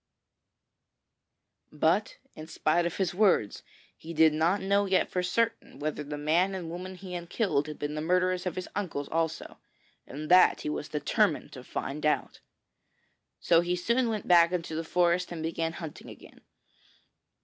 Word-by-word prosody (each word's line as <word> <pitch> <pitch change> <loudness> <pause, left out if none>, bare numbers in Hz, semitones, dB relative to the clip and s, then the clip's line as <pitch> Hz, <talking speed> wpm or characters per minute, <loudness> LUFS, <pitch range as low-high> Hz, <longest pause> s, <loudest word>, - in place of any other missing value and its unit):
But 165 +7 +1 0.2
in 155 0 -10
spite 170 +2 +1
of 170 - -6
his 190 -3 0
words, 185 - +2 0.3
he 165 +1 -9
did 160 0 +5
not 165 +6 +2
know 200 +1 +1
yet 190 -1 +1
for 180 - 0
certain 225 +3 -1
whether 150 +1 -3
the 145 0 -6
man 170 +6 +1
and 170 -3 -5
woman 185 +2 -6
he 185 0 -9
had 175 -1 -6
killed 155 -10 0
had 150 - -7
been 145 0 -4
the 150 - -3
murderers 180 +2 +1
of 175 - -3
his 185 -1 -5
uncles 165 -8 -3
also, 165 -1 -3 0.5
and 150 +3 -7
that 180 0 +6
he - - -3
was 150 0 -4
determined 150 -1 0
to - - -10
find 145 +3 -5
out. 150 - 0 1.0
So 165 -1 +4
he 175 +1 -1
soon 235 +7 +1
went 215 -3 -3
back 170 -1 +6
into 170 -3 -3
the 160 +1 -2
forest 175 +1 +1
and 165 -2 -5
began 165 0 -2
hunting 165 -3 -8
again. - - -14
170 Hz, 170 wpm, -28 LUFS, 155-185 Hz, 1.0 s, that